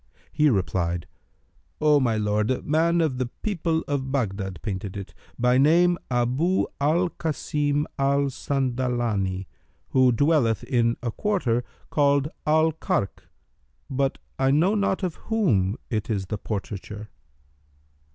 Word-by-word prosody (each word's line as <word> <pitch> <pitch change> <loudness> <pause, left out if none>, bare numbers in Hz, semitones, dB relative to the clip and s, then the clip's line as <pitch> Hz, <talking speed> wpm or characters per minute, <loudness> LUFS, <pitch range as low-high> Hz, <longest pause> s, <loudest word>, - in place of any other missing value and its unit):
He 150 0 +3
replied, 90 - 0 0.7
"O 150 -1 +5
my 120 -5 +1
lord, 105 0 0
a 130 - -1
man 165 +3 +2
of 140 -6 0
the 130 - 0 0.2
people 170 -6 0
of 135 -2 -2
Baghdad 95 -8 -2
painted 100 -2 -4
it, 100 -1 -8 0.2
by 125 +1 +3
name 175 +5 +4
Abu 130 +9 +1 0.2
al 165 +5 +2
Kбsim 150 -1 -1
al 140 +1 +3
Sandalбni 120 -8 -1 0.4
who 130 -1 +4
dwelleth 125 -3 +2
in 120 -3 +1
a 120 - -1
quarter 130 - 0 0.3
called 140 -1 +3 0.2
Al 160 +1 +4
Karkh; 100 -10 -2 0.6
but 135 0 0 0.2
I 135 0 +3
know 160 +9 +3
not 200 -2 0
of 180 -3 -2
whom 115 - +2
it 110 -1 -2
is 100 -4 -1
the 105 +2 -4
portraiture." 105 0 -5
130 Hz, 130 wpm, -25 LUFS, 110-155 Hz, 0.7 s, O